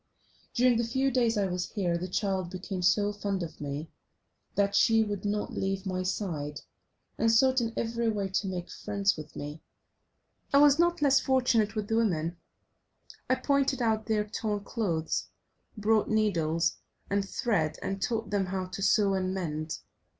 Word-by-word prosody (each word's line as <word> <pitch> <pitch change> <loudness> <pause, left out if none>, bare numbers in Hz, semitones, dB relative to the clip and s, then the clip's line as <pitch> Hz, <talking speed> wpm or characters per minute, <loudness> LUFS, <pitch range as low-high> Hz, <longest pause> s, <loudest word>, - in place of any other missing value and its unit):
During 245 -1 +4
the 235 - +1
few 265 +4 +1
days 235 -3 +2
I 200 - +2
was 180 -1 -3
here 180 -5 0
the 175 +2 -3
child 190 -1 -1
became 185 0 -5
so 205 +3 +3
fond 200 -2 -2
of 160 - -8
me 145 +2 -5 0.6
that 200 0 +2
she 225 -2 +5
would 205 -2 -4
not 205 0 -1
leave 195 0 -2
my 185 -1 -1
side, 160 -6 -3 0.6
and 225 - +4
sought 260 +3 +4
in 230 -1 -1
every 230 0 0
way 205 -3 -1
to 190 +1 -1
make 180 -2 -4
friends 200 -1 0
with 155 -1 -10
me. 150 +2 -6 0.9
I 280 - +5
was 290 +1 +6
not 345 -2 +2
less 280 -1 +5
fortunate 240 -5 +2
with 210 -1 -2
the 225 - +1
women; 170 -6 0 0.9
I 255 - +4
pointed 275 -1 +1
out 220 -3 0
their 215 -2 +2
torn 210 -1 -2
clothes, 175 -8 -1 0.5
brought 215 +1 +2
needles, 170 -7 +1 0.3
and 200 0 +1
thread, 195 -6 0
and 195 0 -3
taught 225 -3 -1
them 200 -2 +1
how 185 0 -3
to 185 +2 -6
sew 200 0 +3
and 185 0 -1
mend. 155 -4 -3
205 Hz, 170 wpm, -29 LUFS, 185-225 Hz, 0.9 s, was